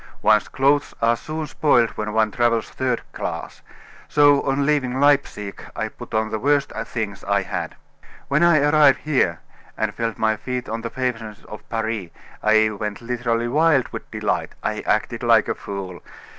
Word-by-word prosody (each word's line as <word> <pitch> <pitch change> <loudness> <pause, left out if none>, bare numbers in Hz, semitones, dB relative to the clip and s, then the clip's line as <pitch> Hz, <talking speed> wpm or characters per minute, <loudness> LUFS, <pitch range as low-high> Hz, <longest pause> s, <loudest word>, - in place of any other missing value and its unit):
"One's 105 -1 +4
clothes 140 +2 +1
are 115 +1 +3
soon 155 +5 -5
spoiled 135 -5 +2
when 105 0 -4
one 110 0 +2
travels 115 -1 +1
third 130 -2 -1
class, - - -5 0.5
so 145 -1 +5
on 140 +1 0
leaving 135 -3 +1
Leipsic 140 -9 +1
I - - -2
put - - -9
on 110 0 0
the 110 - -2
worst 145 +3 +1 0.2
things 105 -4 -4
I 100 0 +1
had. - - -4 0.5
When 140 +3 +2
I 170 -4 +5
arrived 145 -2 +5
here, 110 - +1 0.4
and 110 -1 -1
felt 115 -1 -3
my 110 -1 +1
feet 125 +3 -4
on 115 +1 -4
the 115 - -4
pavements 115 -5 -4
of 105 - -11
Paris, 110 -5 -2 0.3
I 110 0 +4
went 105 0 -4
literally 120 -1 -1
wild 150 0 +3
with - - -8
delight. - - -2
I - - -2
acted - - 0
like - - +4
a - - 0
fool. 95 -3 -7
115 Hz, 170 wpm, -22 LUFS, 110-140 Hz, 0.5 s, so